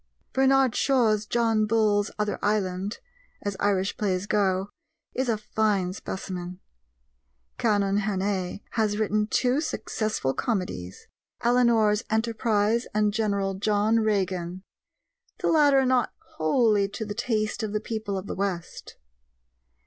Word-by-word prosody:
Bernard 265 -2 +4
Shaw's 220 -6 +2
John 225 -2 +2
Bull's 210 -2 +2
Other 210 -1 -1
Island, 200 -1 -1 0.5
as 205 -1 -2
Irish 195 -1 0
plays 195 -3 -1
go, 200 -1 0 0.4
is 260 -1 -1
a 225 - +1
fine 210 -3 0
specimen; 180 -2 -6 1.0
Canon 200 -1 +2
Hannay 195 -2 -2
has 215 -3 0
written 210 0 +1
two 255 +5 +1
successful 215 - -2
comedies, 180 - -3 0.4
Eleanor's 235 -3 +3
Enterprise 225 0 +1
and 210 -1 +2
General 200 -3 0
John 210 +3 +2
Regan 185 -4 -1 0.7
the - - -1
latter 285 -4 +5
not 255 -1 +2 0.3
wholly 205 +5 +3
to 210 +2 -5
the 205 - -4
taste 220 -1 -1
of 215 -2 -3
the 210 - 0
people 215 -2 -4
of 190 - -5
the - - -4
west. 185 -3 -4
210 Hz, 120 wpm, -26 LUFS, 195-225 Hz, 1.0 s, latter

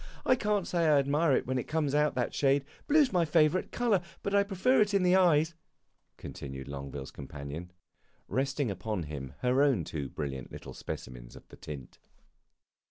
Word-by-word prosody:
I 255 - +5
can't 210 -5 0
say 170 -2 +1
I 150 -2 +5
admire 145 +2 +2
it - - +1
when 130 0 -1
it - - -5
comes 150 -3 0
to 150 +1 +3
that 125 -1 -1
shade. 140 0 +2 0.2
Blue 300 0 +6
's 255 - -7
my 175 -2 +4
favorite 160 +2 +2
color, 230 -7 +2 0.2
but 200 - -2
I 200 - +5
prefer 200 +5 +2
it 205 -1 +2
in 195 - +3
the 180 0 +5
eyes," 165 -3 +4 0.6
continued 65 0 -7
Longueville's 70 -1 -6
companion, 75 +5 -8 0.6
resting 135 +1 0
upon 95 0 -3
him 70 -4 -7
her 125 +2 +3
own 135 - +3
two 70 -3 -5
brilliant 65 -4 -5
little - - -9
specimens - - -8
of - - -14
the - - -12
tint. 70 -4 -9
140 Hz, 180 wpm, -30 LUFS, -, 0.6 s, Blue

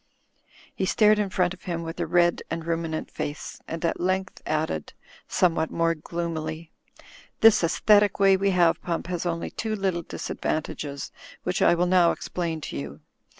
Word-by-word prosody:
He 190 - -1
stared 215 +1 +4
in 205 -2 0
front 180 -1 +1
of 185 - -15
him 170 -2 -3
with 165 +1 -6
a 170 - -1
red 175 +1 +3
and 165 0 -3
ruminan}: 165 -1 -2
face, 145 0 -5
and 165 +1 -4
at 165 - 0
length 185 +1 -1
added, 155 - -2 0.3
somewhat 165 -3 +2
more 165 0 +1
gloomily, 160 0 -5 0.7
"This 225 -4 +7
aesthetic 205 +5 +4
way 195 -1 +6
we 195 +1 +1
have, 175 -3 +3
Hump, 170 -2 -3
has 175 0 -3
only 170 -1 -3
two 220 -1 -3
little 190 -4 -1
disadvantages 145 -3 -4 0.3
which 180 0 -1
I - - +5
will 175 +1 +2
now 180 -1 +5
explain 165 -3 -4
to - - -6
you. 70 +2 -7
170 Hz, 165 wpm, -26 LUFS, 165-185 Hz, 0.7 s, This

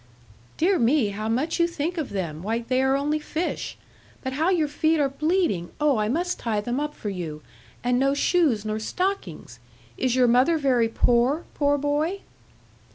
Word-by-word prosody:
'Dear 365 +3 +2
me, 240 -1 +3
how 215 +2 -4
much 265 +10 0
you 340 - +4
think 340 +1 -3
of 315 -5 -3
them! 170 -6 -4
Why, 220 +5 -1
they 255 +2 0
are 265 0 +3
only 295 +2 0
fish. 315 +3 -4 0.5
But 260 -1 -3
how 315 +6 +1
your 335 -5 +2
feet 315 +2 +1
are 285 - +3
bleeding! 305 - 0
oh, 295 -4 +3
I 210 0 0
must 350 +7 -1
tie 220 -3 -1
them 240 +5 -2
up 295 0 -3
for 205 - -4
you. 160 -5 -6 0.4
And 245 0 +2
no 275 +1 +2
shoes 285 - +2
nor 215 0 -2
stockings! 220 - -3 0.4
Is 255 -1 +1
your 255 -1 +4
mother 255 +8 +4
very 255 -6 +2
poor, 245 +7 +2
poor 290 0 +2
boy?' 295 +7 -1
270 Hz, 180 wpm, -25 LUFS, 225-315 Hz, 0.5 s, you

